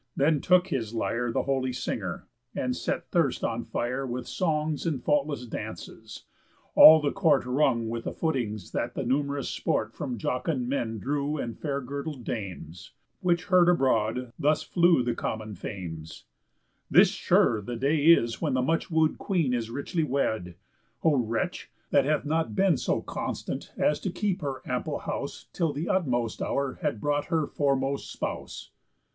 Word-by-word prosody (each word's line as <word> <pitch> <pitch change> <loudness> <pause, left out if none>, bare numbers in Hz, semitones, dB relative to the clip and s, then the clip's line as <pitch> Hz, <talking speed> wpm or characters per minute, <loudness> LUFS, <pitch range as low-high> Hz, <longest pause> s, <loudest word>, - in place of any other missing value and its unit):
Then 145 +1 +2
took 180 +1 +4
his 115 -7 -2
lyre 115 +1 -1
The - - 0
holy 130 -1 0
singer, 125 - -4 0.3
and - - -1
set - - -3
thirst - - +1
on - - -1
fire 125 +3 -2
With 125 -1 -4
songs 155 -3 -1
and 150 -5 0
faultless 145 -1 0
dances; 115 - -8 0.5
all 160 0 +10
the 145 -2 0
court 160 -10 +3
Rung 125 -3 +2
with 115 +1 -4
the - - -2
footings 120 - -2
that - - -2
the - - -2
numerous 140 +2 0
sport 110 +1 -1
From 130 -5 -4
jocund 125 - -1
men 120 -4 -2
drew 145 +6 -1
and 115 -5 -4
fair 140 -2 -3
girdled 140 +1 -5
dames; 90 -6 -6 0.3
Which 175 -1 +1
heard 180 -1 +5
abroad, 125 -6 +1
thus 150 +1 +2
flew 170 -6 +3
the 120 -1 0
common 110 -2 -4
fames: 85 -5 -7 0.6
"This - - +7
sure 110 -3 +2
the 120 +4 -5
day 140 +5 +1
is 120 -9 +5
when 145 -5 0
the 130 - +1
much 165 +5 0
woo'd 160 -2 +2
Queen 165 -10 0
Is 115 -2 -1
richly 140 +6 -2
wed. 110 - -1 0.5
O 160 - +4
wretch! 115 -3 -2 0.2
That 140 -2 +4
hath 150 0 +1
not 160 +2 -1
been 190 -3 +4
So - - -1
constant - - -4
as 150 - +2
to 190 - -3
keep 190 +1 -2
her 140 -3 -4
ample - - -2
house - - -5
Till 165 -3 0
th' 150 +4 -3
utmost 120 - 0
hour 140 -1 -1
had 110 - -1
brought 145 +4 0
her 160 -2 0
foremost 140 -1 -1
spouse." - - -5
140 Hz, 165 wpm, -27 LUFS, 120-155 Hz, 0.6 s, all